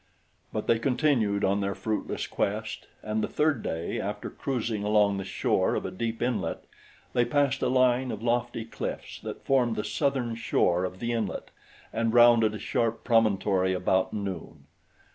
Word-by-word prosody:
But -, -, -3 dB
they 115 Hz, -, +3 dB
continued 125 Hz, -6 st, +1 dB
on 100 Hz, +1 st, +1 dB
their 100 Hz, -1 st, -1 dB
fruitless 105 Hz, +2 st, -2 dB
quest, -, -, -3 dB, 0.2 s
and 110 Hz, 0 st, -1 dB
the -, -, 0 dB
third 150 Hz, -6 st, +1 dB
day, 80 Hz, +1 st, -3 dB
after -, -, -4 dB
cruising 115 Hz, -5 st, -2 dB
along 105 Hz, -1 st, +3 dB
the 95 Hz, -, -3 dB
shore 95 Hz, -, +1 dB
of -, -, -2 dB
a -, -, -3 dB
deep 115 Hz, +4 st, -3 dB
inlet, 125 Hz, -1 st, -1 dB, 0.5 s
they 120 Hz, -, +3 dB
passed 135 Hz, +2 st, +1 dB
a -, -, +2 dB
line 130 Hz, 0 st, +3 dB
of 110 Hz, +1 st, -6 dB
lofty 120 Hz, -1 st, 0 dB
cliffs 115 Hz, -, -6 dB
that -, -, -8 dB
formed 125 Hz, -4 st, +2 dB
the 105 Hz, -, -2 dB
southern 135 Hz, -5 st, 0 dB
shore 90 Hz, -5 st, +1 dB
of 90 Hz, 0 st, -6 dB
the 120 Hz, 0 st, -1 dB
inlet 110 Hz, -4 st, -3 dB, 0.4 s
and 115 Hz, +1 st, 0 dB
rounded 120 Hz, -2 st, +6 dB
a -, -, -6 dB
sharp 115 Hz, +2 st, -1 dB
promontory 100 Hz, -5 st, +2 dB
about 95 Hz, +1 st, +1 dB
noon. 100 Hz, -5 st, -5 dB
115 Hz, 165 wpm, -28 LUFS, 100-120 Hz, 0.5 s, rounded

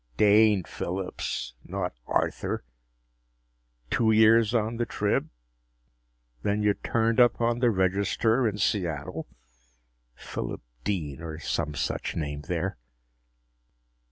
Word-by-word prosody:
Dane 105 Hz, -2 st, +5 dB
Phillips, 80 Hz, -9 st, -4 dB
not -, -, -3 dB
Arthur! -, -, -1 dB, 1.3 s
Two 110 Hz, -1 st, +3 dB
years 110 Hz, 0 st, +5 dB
on 115 Hz, 0 st, 0 dB
the 120 Hz, -, 0 dB
Trib. -, -, 0 dB, 1.1 s
Then 105 Hz, +6 st, 0 dB
you 105 Hz, -1 st, +4 dB
turned 115 Hz, +3 st, 0 dB
up 120 Hz, -2 st, +5 dB
on 120 Hz, 0 st, +1 dB
the 120 Hz, -1 st, +4 dB
Register 100 Hz, +5 st, +2 dB
in 105 Hz, -1 st, -2 dB
Seattle? 85 Hz, -8 st, -1 dB, 0.9 s
Phillip -, -, -5 dB, 0.2 s
Dean, 80 Hz, -6 st, -2 dB
or 80 Hz, -1 st, -6 dB
some 75 Hz, -2 st, -2 dB
such -, -, -2 dB
name 75 Hz, -2 st, -3 dB
there." 90 Hz, -2 st, -2 dB
100 Hz, 105 wpm, -27 LUFS, 85-110 Hz, 1.3 s, Dane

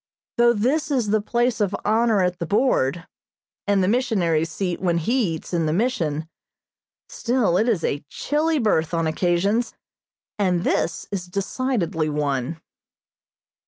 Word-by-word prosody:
Though 235 Hz, 0 st, +5 dB
this 260 Hz, +9 st, 0 dB
is 245 Hz, -8 st, 0 dB
the 215 Hz, 0 st, +2 dB
place 235 Hz, +2 st, 0 dB
of 200 Hz, -1 st, +1 dB
honor 220 Hz, -2 st, +3 dB
at 180 Hz, 0 st, -1 dB
the 170 Hz, -, -3 dB
board, 175 Hz, -, +1 dB, 0.6 s
and 200 Hz, -2 st, +3 dB
the -, -, +1 dB
missionary's 190 Hz, -9 st, +1 dB
seat 180 Hz, 0 st, -3 dB
when 175 Hz, -2 st, +1 dB
he 200 Hz, 0 st, 0 dB
eats 160 Hz, -, -10 dB
in 165 Hz, -2 st, +1 dB
the 155 Hz, -, 0 dB
Mission, 165 Hz, -, -1 dB, 0.8 s
still 235 Hz, -7 st, 0 dB
it 220 Hz, +6 st, +2 dB
is 200 Hz, -8 st, 0 dB
a 145 Hz, -, -1 dB
chilly 310 Hz, +2 st, 0 dB
berth 170 Hz, -, +1 dB
on 165 Hz, -1 st, 0 dB
occasions, 180 Hz, +8 st, 0 dB, 0.6 s
and 180 Hz, -3 st, +1 dB
this 165 Hz, -, 0 dB
is 185 Hz, -3 st, -4 dB
decidedly 195 Hz, -4 st, -1 dB
one. 145 Hz, 0 st, -2 dB
195 Hz, 145 wpm, -23 LUFS, 165-235 Hz, 0.8 s, Though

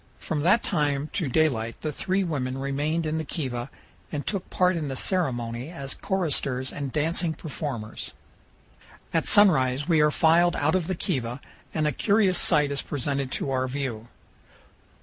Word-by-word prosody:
From 150 Hz, -2 st, -3 dB
that 190 Hz, +9 st, +4 dB
time 145 Hz, 0 st, 0 dB
to 165 Hz, -9 st, -1 dB
daylight 120 Hz, -6 st, +1 dB
the 155 Hz, -, -1 dB
three 190 Hz, +6 st, 0 dB
women 135 Hz, -7 st, -2 dB
remained 145 Hz, +4 st, -1 dB
in 155 Hz, +1 st, -1 dB
the -, -, -2 dB
kiva 130 Hz, -5 st, -4 dB, 0.4 s
and 145 Hz, -2 st, -4 dB
took 195 Hz, -3 st, -3 dB
part 180 Hz, 0 st, +2 dB
in 155 Hz, -3 st, -2 dB
the 135 Hz, -, -4 dB
ceremony 125 Hz, -7 st, -1 dB
as 140 Hz, -6 st, -6 dB
choristers 145 Hz, -9 st, -1 dB
and 140 Hz, -2 st, -4 dB
dancing 160 Hz, +2 st, 0 dB
performers. 135 Hz, -8 st, -5 dB, 1.0 s
At -, -, +1 dB
sunrise 145 Hz, -9 st, +5 dB
we 165 Hz, -3 st, +4 dB
are 150 Hz, -, +5 dB
filed 170 Hz, +3 st, +4 dB
out 145 Hz, +2 st, +1 dB
of 185 Hz, -3 st, 0 dB
the 185 Hz, -, -1 dB
kiva, 125 Hz, -, -2 dB, 0.3 s
and 155 Hz, -1 st, 0 dB
a 150 Hz, -, +2 dB
curious 200 Hz, -, +3 dB
sight 150 Hz, -1 st, +4 dB
is 140 Hz, -, -1 dB
presented 140 Hz, -1 st, -2 dB
to 135 Hz, -, -2 dB
our 130 Hz, 0 st, 0 dB
view. 125 Hz, -4 st, -4 dB
150 Hz, 165 wpm, -26 LUFS, 130-170 Hz, 1.0 s, sunrise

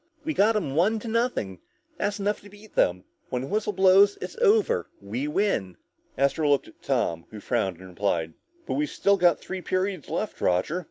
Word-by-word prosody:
We 315 Hz, +1 st, -2 dB
got 220 Hz, -2 st, +3 dB
'em 165 Hz, -10 st, -1 dB
one 190 Hz, +9 st, +3 dB
to 235 Hz, -, -7 dB
nothing, 225 Hz, -, -1 dB, 0.4 s
that's 205 Hz, 0 st, -2 dB
enough 205 Hz, +1 st, -1 dB
to 205 Hz, -, -14 dB
beat 205 Hz, +1 st, -16 dB
them. 90 Hz, +1 st, +2 dB, 0.3 s
When 125 Hz, 0 st, -2 dB
the -, -, -5 dB
whistle 210 Hz, 0 st, 0 dB
blows 195 Hz, +1 st, +5 dB
and -, -, -10 dB
it's -, -, -6 dB
over, 455 Hz, +1 st, +3 dB
we 115 Hz, +8 st, -4 dB
win!" 150 Hz, -, 0 dB, 0.4 s
Astro 140 Hz, +3 st, +2 dB
looked 140 Hz, -1 st, +2 dB
at -, -, -21 dB
Tom, 85 Hz, 0 st, -1 dB
who 110 Hz, -, -9 dB
frowned 95 Hz, -3 st, -1 dB
and 95 Hz, +1 st, -12 dB
replied, 85 Hz, -4 st, -1 dB, 0.3 s
"But -, -, -3 dB
we've 300 Hz, +2 st, 0 dB
still 200 Hz, 0 st, +2 dB
got 175 Hz, -4 st, +4 dB
three 190 Hz, -1 st, -6 dB
periods 185 Hz, -1 st, -2 dB
left, -, -, -3 dB
Roger. 90 Hz, -, +1 dB
185 Hz, 200 wpm, -26 LUFS, -, 0.4 s, blows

